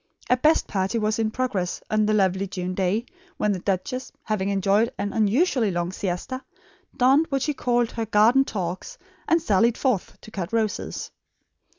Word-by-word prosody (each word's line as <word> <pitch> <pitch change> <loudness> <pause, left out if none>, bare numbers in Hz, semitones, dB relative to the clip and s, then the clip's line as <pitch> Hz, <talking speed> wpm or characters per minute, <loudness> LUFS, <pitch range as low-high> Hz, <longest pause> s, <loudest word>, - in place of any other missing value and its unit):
A - - +7
"best 305 +5 +3
party" 195 +2 -1
was 215 0 0
in 220 -1 +1
progress 215 -7 -2
on 215 -1 +2
the 215 - +2
lovely 190 -1 +1
June 185 -1 -4
day 195 +5 0 0.3
when 210 - +1
the 190 - -1
duchess, 195 +8 -2
having 205 -3 -1
enjoyed 200 +4 +2
an 205 - -3
unusually 225 - +2
long 175 -1 -2
siesta, 190 +8 -4 0.5
donned 270 +6 +4
what 275 -2 0
she 300 - 0
called 240 -3 0
her 225 -1 -3
"garden 225 +6 +5
togs" 190 - -5 0.3
and 335 0 +4
sallied 230 - +2
forth 250 -9 -1
to 220 - -13
cut 190 -3 -4
roses. 220 -2 -2
215 Hz, 170 wpm, -24 LUFS, 190-250 Hz, 0.5 s, A